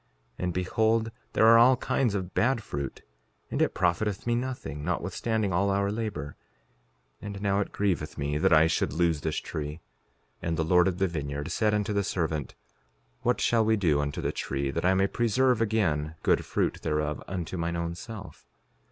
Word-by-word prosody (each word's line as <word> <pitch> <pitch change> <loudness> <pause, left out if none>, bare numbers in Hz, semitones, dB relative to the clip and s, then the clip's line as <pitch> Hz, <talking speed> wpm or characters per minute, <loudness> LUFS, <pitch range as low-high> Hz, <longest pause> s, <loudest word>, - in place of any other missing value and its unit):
And 90 0 -1
behold, 110 +5 +1 0.2
there 110 - +4
are 115 +1 +8
all 125 +2 +6
kinds 120 -4 0
of 95 -2 -4
bad 120 -1 +1
fruit; 70 -6 -5 0.5
and - - -1
it - - +1
profiteth 95 +3 0
me 120 - +1
nothing, 120 - -3
notwithstanding 100 +4 -1
all 100 +3 +2
our 100 0 +1
labor; 105 -10 -4 0.9
and 100 -1 -6
now 100 0 +1
it 100 - -2
grieveth 90 -7 -1
me 75 +1 -1
that - - +3
I 80 0 +7
should 80 - 0
lose 85 -2 +1
this 80 +1 -2
tree. 75 -1 -4 0.7
5:33 - - -4
And 85 -1 -1
the 80 - +1
Lord 90 +3 +4
of 90 -2 -1
the 95 0 +2
vineyard 75 -3 -4
said 105 -3 +2
unto 105 0 -1
the 100 0 +1
servant: 80 -7 -2 0.7
What - - +1
shall 115 -1 +3
we 110 0 +3
do 80 -7 +2
unto 70 0 -3
the - - -1
tree, 70 0 -2
that 85 +4 -2
I 95 +1 +4
may 95 +1 +3
preserve 120 +3 +2
again 85 -9 0
good - - +2
fruit - - -1
thereof 75 -2 -1
unto 90 -1 -4
mine 85 0 -2
own 85 0 -2
self? 105 +4 -10
95 Hz, 185 wpm, -28 LUFS, 80-110 Hz, 0.9 s, are